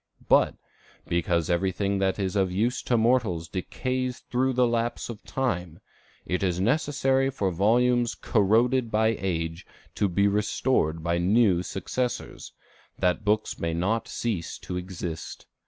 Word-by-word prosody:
But, - - +4 0.5
because 85 -1 0
everything 95 +3 0
that 95 -1 +1
is 95 -2 -2
of 95 -2 +2
use 115 +6 0
to 120 - +1
mortals 110 -8 +1
decays 125 +8 -3
through 130 +1 +1
lapse 120 -1 0
of 115 -3 -8
time, 90 -11 -2 0.5
it 90 - -1
is 90 -2 0
necessary 135 +3 +2
for 100 -8 -1
volumes 120 +6 +2
corroded 115 +4 +2
by 110 +1 +2
age 80 -1 -2 0.3
to 100 - 0
be 100 +3 +2
restored 100 -5 0
by 85 0 0
new 95 0 +3
successors, 120 +7 -4 0.5
that 90 +2 +1
books 105 +1 0
may 85 -1 -1
not 105 +7 0
cease 105 -8 -3
to 90 - -7
exist. 90 -3 -6
100 Hz, 135 wpm, -26 LUFS, 90-120 Hz, 0.5 s, But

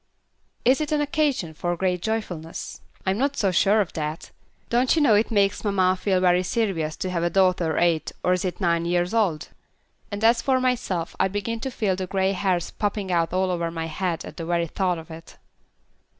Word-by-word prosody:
"Is 265 +4 +4
it 300 - -2
an 300 - +2
occasion 290 - 0
for 175 +2 -2
great 180 -1 0
joyfulness? 180 -7 -4 0.2
I'm 190 +2 0
not 280 +1 0
so 195 -4 +2
sure 205 +4 +4
of 190 - -4
that. 155 0 -4 0.4
Don't 245 +4 +3
you - - +2
know 245 -7 +5
it 210 +2 +3
makes 200 -3 +1
mamma 190 -3 +2
feel 190 0 +1
very 180 0 +4
serious 180 -6 -1
to 185 - -4
have 170 -2 -1
a 170 - +1
daughter 180 -3 +2
eight 170 -2 +1
or 180 - +3
is 180 - -1
it 185 -2 -3
nine 170 -3 +1
years 175 +2 0
old? 195 -9 0 0.6
And 205 +1 -5
as 230 +1 +5
for 260 -1 +2
myself, 245 -10 -1
I 190 - +4
begin 205 +4 -3
to 265 - -3
feel 210 -6 0
the 185 0 -4
grey 190 +1 +1
hairs 185 -3 -1
popping 205 -2 -2
out 170 -2 +1
all 185 +1 +1
over 170 -1 -1
my 165 -1 -4
head 165 +1 -3
at - - -10
the 165 - -5
very 170 -1 +1
thought 180 +1 -1
of 160 0 -10
it." 160 +1 -11
185 Hz, 205 wpm, -24 LUFS, 170-215 Hz, 0.6 s, know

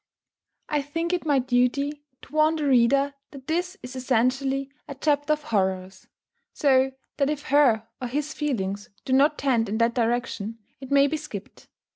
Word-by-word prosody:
I 300 -4 0
think 330 +5 -3
it 350 -3 -2
my 285 -2 +4
duty 260 +3 +1 0.2
to - - -15
warn 310 +1 +3
the 305 -2 -2
reader 275 +2 +3 0.2
that 275 -2 -12
this 355 +5 -2
is 250 +1 -8
essentially 265 +2 0 0.2
a 280 - -7
chapter 290 +1 +1
of 305 0 -4
horrors; 190 -6 -2 0.5
so 265 -2 +3 0.2
that 280 0 +2
if 295 -1 -3
her 250 -6 +4
or 250 - -2
his 295 +4 -3
feelings 205 -9 -2 0.2
do 260 - -1
not 290 +3 +4
tend 235 -6 +1
in 215 - -1
that 230 +1 +2
direction, 230 -2 -1 0.2
it 265 -1 -9
may 280 0 +5
be 305 +2 0
skipped. 225 -10 -9
275 Hz, 170 wpm, -25 LUFS, 240-295 Hz, 0.5 s, may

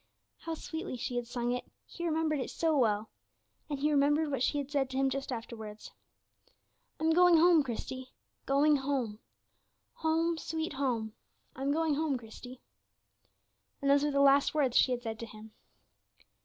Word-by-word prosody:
How 330 -1 -4
sweetly 320 -2 -5
she 250 0 -4
had 240 -1 -3
sung 240 0 -2
it! 250 0 -2 0.2
he 345 - -9
remembered 315 -2 0
it 260 - -3
so 325 -2 0
well. 215 -5 +1 0.6
And 290 - -2
he 295 +2 +1
remembered 295 +2 +2
what 270 - -2
she 290 - +1
had 285 -1 -4
said 275 -3 0
to 265 - -4
him 270 0 +2
just 275 0 -4
afterwards, 220 -3 -7 1.1
"I'm 320 +1 +2
going 355 0 +6
home, 335 -1 +6
Christie 260 0 -5 0.4
going 290 +2 +4
home 265 -6 -2 0.7
home, 325 +1 0
sweet 320 -1 -3
home; 240 -6 -1 0.4
I'm 270 +2 -1
going 320 0 +1
home, 290 -2 0
Christie." 245 +2 -11 1.2
And 275 0 +2
those 285 0 +4
were 295 - +2
the 280 -1 +2
last 280 +2 +4
words 270 -5 +1
she 255 - +5
had 245 -1 -2
said 220 -2 -5
to 230 - -6
him. 215 0 -12
275 Hz, 170 wpm, -31 LUFS, 245-310 Hz, 1.2 s, going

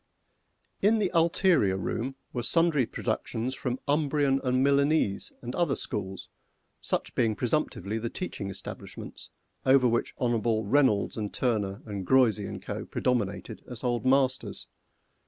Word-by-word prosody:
In 215 +3 +4
the 200 -4 0
ulterior 165 - +3
room 125 +7 -3 0.2
were 120 - -1
sundry 150 0 +3
productions 115 +3 -2
from 125 -1 -3
Umbrian 145 -2 +2
and 130 0 +2
Milanese 140 -6 +2
and 120 +1 -5
other 170 -6 +1
schools, 95 -2 -5 0.5
such - - -1
being 110 -2 +1
presumptively 100 +3 -1
the 115 +1 -3
teaching 110 - -5
establishments 100 - -8 0.3
over 130 -1 +5
which 115 0 0
Hon'ble 115 -3 +1
REYNOLDS 130 -4 +2
and 105 -2 -3
TURNER 105 -6 -1
and 100 -3 -4
GREUZY 110 -2 +3
and - - -7
Co. - - -4
predominated 120 -6 -2
as 125 -1 -8
Old 120 -1 0
Masters. 130 0 +1
125 Hz, 135 wpm, -28 LUFS, 110-140 Hz, 0.5 s, over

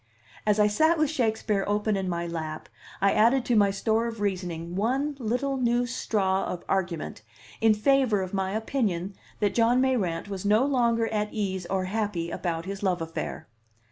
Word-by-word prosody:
As 210 0 +3
I 210 - +6
sat 315 +11 +3
with 310 -1 +2
Shakespeare 220 -7 0
open 210 +1 +1
in 190 -1 -2
my 170 -1 -2
lap, 160 -2 -5 0.3
I 200 0 +4
added 240 +4 +4
to 245 - +2
my 205 -2 +5
store 220 +3 0
of 225 -2 -6
reasoning 180 -4 -3
one 265 +8 0
little 250 +4 -1
new 240 -1 +2
straw 200 -6 0
of 175 - -5
argument 180 - -2 0.4
in 220 -1 +5
favor 230 -3 +3
of 185 - -7
my 190 0 -1
opinion 210 -5 -1 0.3
that 205 -1 +2
John 235 +2 +3
Mayrant 215 -11 0
was 195 -2 -5
no 210 +5 +4
longer 235 -4 +2
at 210 -1 -1
ease 190 -4 -3
or 190 -1 0
happy 190 -4 -2
about 165 -2 -3
his 195 0 -5
love 185 -3 +1
affair. 165 -1 -5
210 Hz, 175 wpm, -27 LUFS, 185-235 Hz, 0.4 s, I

